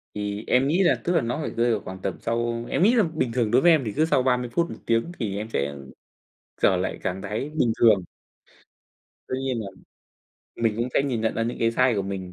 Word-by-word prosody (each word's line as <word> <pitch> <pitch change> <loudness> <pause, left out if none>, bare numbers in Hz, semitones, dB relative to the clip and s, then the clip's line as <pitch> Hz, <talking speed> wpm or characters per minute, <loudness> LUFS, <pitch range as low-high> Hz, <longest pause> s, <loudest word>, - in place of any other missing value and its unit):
Thì 105 +1 -3
em 130 +2 +3
nghĩ 175 +6 +2
là 175 - +4
tức 175 - 0
là 165 - +3
nó 120 +5 -2
phải - - -3
rơi 120 +1 +1
vào 110 - 0
khoảng 95 0 -9
tầm - - -4
sau 115 0 -2
em - - +1
nghĩ 225 +5 +5
là 225 - +5
bình 155 -8 -2
thường 115 -3 0
đối 125 +2 +5
với 175 - +6
em 155 -4 +4
thì 105 - -3
cứ 155 - +3
sau 130 -5 +2
30 125 -2 +1
phút 170 0 +1
1 - - -7
tiếng 115 +9 +1
thì 100 -5 -2
em 110 +2 -5
sẽ 70 -6 -2 0.9
trở - - +4
lại - - -3
trạng 90 +1 -2
thái 110 +9 -4
bình 120 -7 +2
thường. 105 -6 +5 1.2
Tuy 130 - -2
nhiên 130 -3 -2
là 100 - -6 0.9
mình 115 -2 0
cũng 120 +2 -1
sẽ - - +4
nhìn 130 -5 -1
nhận 110 0 0
ra 115 - -1
những 120 +2 -3
cái 115 - +2
sai 125 +1 +2
của 100 - 0
mình. 95 -2 -5
115 Hz, 250 wpm, -24 LUFS, 105-135 Hz, 1.2 s, với